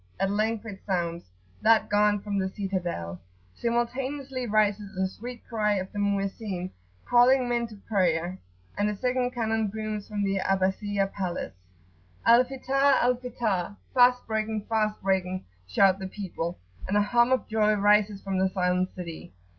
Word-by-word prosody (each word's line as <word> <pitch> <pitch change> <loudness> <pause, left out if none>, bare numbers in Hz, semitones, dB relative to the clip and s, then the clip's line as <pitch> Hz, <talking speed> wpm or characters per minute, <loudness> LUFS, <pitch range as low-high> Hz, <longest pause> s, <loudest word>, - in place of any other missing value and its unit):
at 195 - +1
length 215 +1 0
it 200 -3 -7
sounds, 170 - -2 0.3
that 225 0 +4
gun 205 0 +3
from 200 0 -2
the 190 0 -1
citadel. 175 - -4 0.3
Simultaneously 255 - -2
rises 205 -2 +1
the 190 0 +1
sweet 240 +5 -9
cry 215 -3 +1
of 190 -1 -3
the 205 - -5
Mu'ezzin, 195 -2 -2 0.3
calling 250 +1 +5
men 240 -1 0
to 220 - -12
prayer, 180 -3 +1 0.4
and 205 +1 +1
the 210 - -2
second 250 +1 0
cannon 225 -3 -1
booms 215 0 -4
from 210 -2 -2
the 195 -1 0
Abbasiyah 195 +1 0
Palace,[FN#8] 180 -3 -3 0.7
"Al 235 +2 +7
Fitar! 270 +1 +2
Al 245 +1 +3
[p.79]Fitar!" 225 -6 -2 0.2
fast 250 0 +5
breaking! 220 -1 -2
fast 215 -2 0
breaking! 185 -1 0 0.2
shout 190 - +4
the 190 - -4
people, 180 -4 -5 0.3
and 200 - +1
a - - +5
hum 240 +3 +3
of 260 - +1
joy 215 -1 +2
rises 205 0 +3
from 195 -1 -1
the 190 0 +3
silent 180 0 +1
city. 165 - -8
205 Hz, 155 wpm, -27 LUFS, 190-230 Hz, 0.7 s, Al